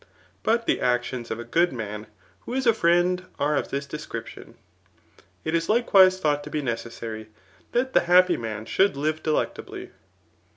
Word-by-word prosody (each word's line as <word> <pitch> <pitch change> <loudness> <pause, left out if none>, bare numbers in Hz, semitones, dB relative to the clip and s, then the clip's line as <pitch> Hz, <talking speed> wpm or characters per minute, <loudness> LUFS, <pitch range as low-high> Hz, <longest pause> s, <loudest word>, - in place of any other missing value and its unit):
But 230 +1 +1
the - - +1
actions 120 -1 -1
of 110 - -4
a - - -5
good 170 +9 +2
man 105 -3 -6 0.4
^»b# 250 - -2
is 265 - -1
a 230 - +5
friend 175 -1 +2
are 150 +1 +1
of - - -1
diis 140 +1 -4
description. 115 -6 -8 0.9
It 160 - -2
is 165 0 0
likewise 195 -5 +5
^thought 145 -3 +1
to 150 - -9
be 150 -1 -3
necessary, 115 -2 -5 0.4
that 260 +2 0
the - - +6
happy 180 0 +6
man 110 -2 -5
should 190 - +2
live 155 +2 -1
d^ett 155 -1 -1
ably. - - -9
150 Hz, 170 wpm, -25 LUFS, 120-180 Hz, 0.9 s, the